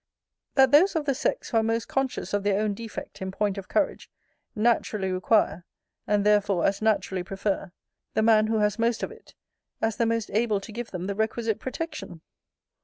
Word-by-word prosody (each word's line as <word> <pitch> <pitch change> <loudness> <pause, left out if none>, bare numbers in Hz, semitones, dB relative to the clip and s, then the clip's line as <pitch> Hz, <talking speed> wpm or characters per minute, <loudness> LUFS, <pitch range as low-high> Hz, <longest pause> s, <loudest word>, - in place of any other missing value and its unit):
That 265 -2 +6
those 335 +6 +6
of 315 -2 0
the 275 - +2
sex, 300 - -2
who 230 - +2
are - - +5
most 225 +1 -1
conscious 270 -5 -2
of 205 - +2
their 200 0 +1
own 215 -1 0
defect 225 -1 -8
in 190 - -3
point 200 0 -1
of 190 - -10
courage, 300 - -1 0.5
naturally 215 -3 +1
require, 185 -1 +2 0.4
and 205 -1 +2
therefore 205 -4 +3
as 195 +1 +1
naturally 210 -4 +1
prefer, 195 +1 -3 0.4
the 220 - +3
man 215 -1 +5
who 220 0 +1
has 210 +1 +1
most 230 0 +1
of - - -3
it, - - -16 0.4
as 225 -1 0
the 230 - +2
most 230 -1 -1
able 215 -1 +2
to 195 - -10
give 235 +2 -5
them 180 -1 -5
the 200 - -2
requisite 220 +1 -1
protection? 260 - -6
215 Hz, 190 wpm, -26 LUFS, 200-230 Hz, 0.5 s, That